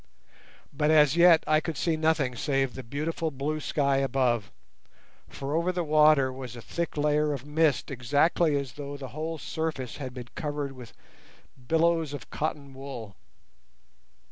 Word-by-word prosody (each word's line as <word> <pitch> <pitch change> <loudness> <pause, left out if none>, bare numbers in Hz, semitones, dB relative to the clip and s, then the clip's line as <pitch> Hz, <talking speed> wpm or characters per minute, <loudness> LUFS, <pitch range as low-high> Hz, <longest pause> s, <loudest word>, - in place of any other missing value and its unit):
But 150 +1 +1
as 150 -2 +5
yet 170 -1 +6
I 155 0 +4
could 160 -1 -5
see 165 -2 +1
nothing 155 -5 +1
save 135 -1 0
the 130 - -6
beautiful 155 +6 -3
blue 150 +2 -3
sky 140 -2 +1
above, 130 -5 +1 0.8
for 140 +1 -5
over 170 +3 +1
the 180 -1 -2
water 150 -4 +4
was 130 -2 -8
a - - -8
thick 170 +5 -4
layer 150 0 +2
of 140 -1 -6
mist 150 -2 +1
exactly 145 +5 +2
as 140 -3 -4
though 145 0 -7
the 135 -2 -7
whole 160 +5 -4
surface 155 -4 -4
had 130 -3 -6
been 120 -2 -8
covered 145 -4 -3
with 125 -4 -12 0.7
billows 165 -1 +2
of 140 -6 -8
cotton 145 -3 -3
wool. 130 -7 -8
145 Hz, 155 wpm, -27 LUFS, 135-155 Hz, 0.8 s, yet